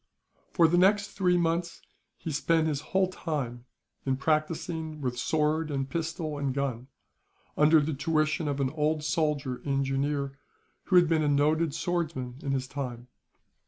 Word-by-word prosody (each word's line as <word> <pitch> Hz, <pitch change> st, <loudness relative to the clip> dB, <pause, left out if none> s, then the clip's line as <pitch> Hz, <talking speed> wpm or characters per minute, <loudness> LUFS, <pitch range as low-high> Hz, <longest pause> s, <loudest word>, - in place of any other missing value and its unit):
For 170 Hz, -2 st, +5 dB
the 175 Hz, +2 st, +3 dB
next 200 Hz, +2 st, +4 dB
three 180 Hz, -3 st, +2 dB
months 170 Hz, 0 st, 0 dB, 0.4 s
he 160 Hz, -, -5 dB
spent 160 Hz, +2 st, +2 dB
his 150 Hz, -3 st, -1 dB
whole 190 Hz, +4 st, +1 dB
time 140 Hz, -10 st, -4 dB, 0.4 s
in 135 Hz, -1 st, 0 dB
practising 155 Hz, +1 st, -1 dB
with 125 Hz, -3 st, -2 dB
sword, 155 Hz, +3 st, +1 dB, 0.2 s
pistol, 160 Hz, -2 st, -3 dB
and 135 Hz, -2 st, -1 dB
gun; 130 Hz, -3 st, -2 dB, 0.7 s
under 155 Hz, +2 st, +6 dB
the 150 Hz, +1 st, -1 dB
tuition 155 Hz, +2 st, 0 dB
of 140 Hz, -1 st, -1 dB
an 130 Hz, -1 st, 0 dB
old 155 Hz, 0 st, 0 dB
soldier 150 Hz, -5 st, 0 dB
in 140 Hz, -1 st, -1 dB
Jooneer, 140 Hz, +1 st, -1 dB, 0.5 s
who 185 Hz, -, +1 dB
had 175 Hz, -1 st, +7 dB
been 160 Hz, -1 st, +2 dB
a 150 Hz, -, +1 dB
noted 150 Hz, +2 st, +2 dB
swordsman 155 Hz, -9 st, -2 dB
in 140 Hz, -, -2 dB
his 130 Hz, -1 st, -1 dB
time. 125 Hz, -3 st, -6 dB
150 Hz, 155 wpm, -28 LUFS, 140-165 Hz, 0.7 s, had